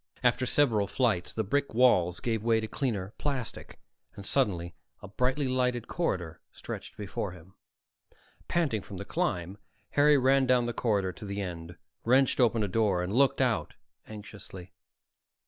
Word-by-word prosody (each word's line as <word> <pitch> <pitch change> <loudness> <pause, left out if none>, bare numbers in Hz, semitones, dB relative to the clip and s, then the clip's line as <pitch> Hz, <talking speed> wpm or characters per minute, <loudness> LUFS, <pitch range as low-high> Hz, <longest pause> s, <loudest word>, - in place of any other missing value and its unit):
After 125 +1 +2
several 115 -9 +3
flights, 110 -7 0
the 110 - -2
brick 140 +4 -1
walls 90 -9 +4
gave 115 -3 -1
way 115 0 +3
to 110 - -3
cleaner 105 -6 -3
plastic, 135 -6 -4 0.4
and 100 - -9
suddenly 90 -11 0 0.3
a - - -7
brightly 130 +7 0
lighted 125 -2 0
corridor 90 - -2
stretched - - -8
before 100 -2 -4
him. 90 +1 -15 0.9
Panting 145 -11 0
from - - -9
the - - -6
climb, 90 +3 -2 0.3
Harry 145 0 +5
ran 135 0 +3
down 125 -1 +3
the 120 - -2
corridor 100 -6 0
to 100 - -10
the 100 0 -4
end, 85 -3 -6 0.3
wrenched 130 +3 +3
open 115 -3 +3
a - - 0
door, 100 -3 +1
and 90 +3 -3
looked 135 +2 +3
out - - 0 0.3
anxiously. 100 -4 -10
110 Hz, 155 wpm, -29 LUFS, 95-130 Hz, 0.9 s, Harry